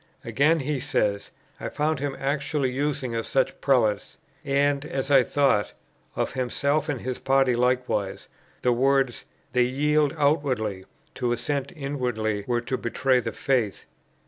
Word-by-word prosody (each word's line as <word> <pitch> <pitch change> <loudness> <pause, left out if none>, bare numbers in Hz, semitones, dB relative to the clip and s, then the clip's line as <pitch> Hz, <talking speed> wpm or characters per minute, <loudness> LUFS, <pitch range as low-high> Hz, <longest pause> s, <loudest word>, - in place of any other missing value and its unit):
Again, 155 +3 +2
he 145 0 -2
says: 100 -4 -1 0.3
"I - - -4
found 150 0 -1
him 140 -1 -3
actually 140 -1 -1
using 135 -2 -2
of 115 -1 -2
such 135 -1 0
[prelates], 125 -7 +1 0.3
(and, 140 0 +1
as 135 -2 -3
I 135 -2 +7
thought, 135 -5 +1 0.4
of - - -1
himself 140 +4 0
and 135 -4 -2
his 130 -1 -4
party 135 -1 +3
likewise,) 125 -5 0 0.4
the 125 - +4
words 135 0 +1 0.3
'They 125 - +3
yield 150 +3 +1
outwardly; 130 -10 0 0.3
to 125 -2 -1
assent 140 +3 -2
inwardly 125 -8 -2
were 120 -1 +1
to 125 +2 -3
betray 130 +2 +1
the 115 -2 -3
faith. 120 -7 -1
135 Hz, 145 wpm, -25 LUFS, 120-140 Hz, 0.4 s, I